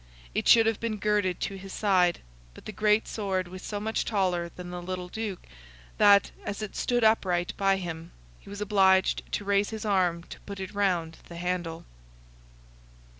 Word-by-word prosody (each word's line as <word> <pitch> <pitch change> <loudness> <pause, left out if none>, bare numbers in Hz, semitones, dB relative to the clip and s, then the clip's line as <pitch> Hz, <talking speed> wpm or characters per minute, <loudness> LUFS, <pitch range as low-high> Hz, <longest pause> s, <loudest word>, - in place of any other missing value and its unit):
It - - -1
should 225 -1 +7
have 225 -1 +1
been 230 -2 -2
girded 205 -3 0
to 195 -1 -3
his 195 0 -10
side, 185 -4 +2 0.3
but - - -14
the - - -5
great 210 +1 +2
sword 190 -4 -2
was 185 +1 -9
so 205 +1 -4
much 220 +2 -1
taller 180 -5 0
than 180 0 -9
the 180 0 -5
little 180 0 -5
Duke, 215 -3 -5 0.5
that, 200 -1 +6
as 205 +1 -4
it 215 - -7
stood 245 -1 0
upright 185 -6 +2
by 195 -1 +2
him, 170 -3 -6 0.3
he - - -15
was 200 +1 -7
obliged 190 -2 +3
to 205 - -2
raise 200 0 +2
his 220 -1 -6
arm 180 -4 +1
to - - -11
put 200 -1 -9
it 190 +1 -6
round 180 -5 0
the 170 - -9
handle. 175 -2 -3
195 Hz, 180 wpm, -27 LUFS, 180-210 Hz, 0.5 s, should